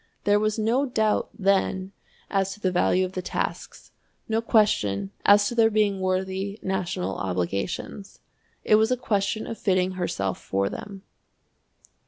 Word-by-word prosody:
There 205 0 +3
was 215 +1 0
no 235 +6 +1
doubt, 220 -4 +1
then, 190 -1 +1 0.4
as 195 -1 0
to - - -19
the 185 -3 0
value 180 +1 +2
of 185 - -6
the 185 - -4
tasks, - - -5 0.4
no 225 0 0
question 105 - +2 0.2
as 205 0 +6
to - - -3
their 225 -1 +4
being 210 -2 +1
worthy 190 +2 -2
national 185 - -2
obligations. 100 - -3 0.5
It 215 - +5
was 220 +1 +3
a 255 - +1
question 215 -2 -1
of 225 - -6
fitting 185 -2 +1
herself 100 - -3
for 100 0 -1
them. 195 -1 -8
195 Hz, 150 wpm, -25 LUFS, 185-215 Hz, 0.5 s, as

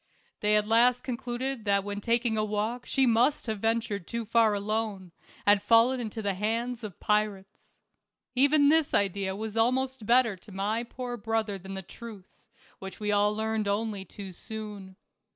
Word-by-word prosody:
They 210 0 +3
at 210 0 +2
last 240 +2 +4
concluded 250 0 -4
that 200 -1 +2
when 205 0 -5
taking 235 0 +1
a 215 - +1
walk 215 +4 -2
she 270 - +3
must 245 +5 +2
have 220 -3 -3
ventured 225 -4 -1
too 235 -1 -4
far 225 -1 +3
alone, 205 -3 -2 0.3
and 205 -1 +5
fallen 230 +4 +4
into 220 -2 -5
the 200 -1 0
hands 230 +4 -2
of 205 -5 -8
pirates. 210 -2 -2 0.6
Even 285 +2 +5
this 315 -1 +3
idea 195 -1 0
was 215 +1 -5
almost 255 0 0
better 240 -3 +4
to 190 +3 -16
my 205 +4 -1
poor 245 0 -6
brother 220 -2 -2
than 190 +1 -8
the 190 - -6
truth, 210 0 -12 0.4
which 190 0 -8
we 210 -1 -1
all 205 0 +3
learned 220 -1 -1
only 205 -1 -1
too 195 0 -9
soon. 205 -1 -8
220 Hz, 170 wpm, -28 LUFS, 205-235 Hz, 0.6 s, and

